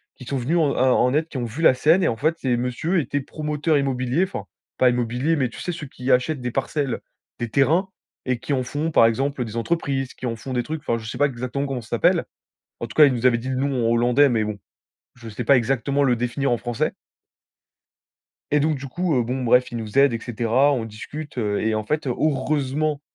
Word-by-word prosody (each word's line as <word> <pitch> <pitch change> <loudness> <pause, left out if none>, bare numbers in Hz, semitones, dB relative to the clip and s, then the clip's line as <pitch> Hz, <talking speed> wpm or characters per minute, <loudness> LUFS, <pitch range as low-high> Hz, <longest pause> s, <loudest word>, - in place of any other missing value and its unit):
qui 130 - -12
sont 135 +2 -2
venus 135 +8 0
en 150 -4 +2
à - - +2
en 125 0 +3
aide, 155 +2 +1
qui 145 - -7
ont 125 - -2
vu 120 +8 -6
la 145 - +6
scène. 160 +8 +3
Et - - +3
en 115 - 0
fait, 155 +7 0
ces 130 -2 +1
monsieur 125 +9 -1
étaient 145 -1 -1
promoteurs 150 +2 -1
immobiliers, 135 +3 0
enfin 190 - -4 0.3
pas 130 - +5
immobiliers, 125 +6 0
mais 130 -6 0
tu - - -11
sais, 180 - -3
ceux 155 -4 -7
qui 125 0 -6
achètent 125 +3 +2
des 125 0 -3
parcelles, 135 0 -2 0.4
des 120 -1 -3
terrains 160 - +2 0.4
et 125 -2 -1
qui 130 +4 -3
en 130 -2 0
font 150 +6 -3
par 115 - +6
exemple 135 +3 -1
des 110 +1 -7
entreprises, 135 -1 -1
qui - - -8
en 115 -2 -2
font 130 +3 -6
des 125 -1 0
trucs. 155 +4 -5
Enfin, 115 - +1
je 110 -1 -7
sais 125 - -6
pas 145 - +4
exactement 130 +2 -3
comment 135 -3 -3
ça 115 - -15
s'appelle. - - +2 0.6
En 115 - -4
tout - - -12
cas, 155 - +8
ils 140 - +3
nous 120 0 -3
avaient 120 -2 +5
dit 125 +3 -5
le 130 - -1
nom 130 -3 0
en - - +2
hollandais, 120 +4 +4
mais 115 -3 +1
bon, 105 -1 -4 0.6
je 120 -2 -12
sais 110 +3 -5
pas 135 +4 +5
exactement 135 +3 0
le 125 -3 +3
définir 125 +4 -1
en 120 - +2
français. 120 0 -2 1.6
Et 150 - +4
donc 155 +1 +1
du 135 +1 -7
coup, 175 +3 -1
heu, 120 - +2
bon 125 +2 -3
bref, 125 +1 +3
ils 120 - -4
nous 110 +1 -5
aident, 140 -2 +5
et 115 - -2
cetera. 120 +4 +1
On 125 -5 -1
discute, 140 +7 -8
heu, 105 -3 0
et 110 0 0
en 110 - -1
fait, 150 +5 -2
heureusement 145 +2 0
130 Hz, 245 wpm, -23 LUFS, 120-145 Hz, 1.6 s, cas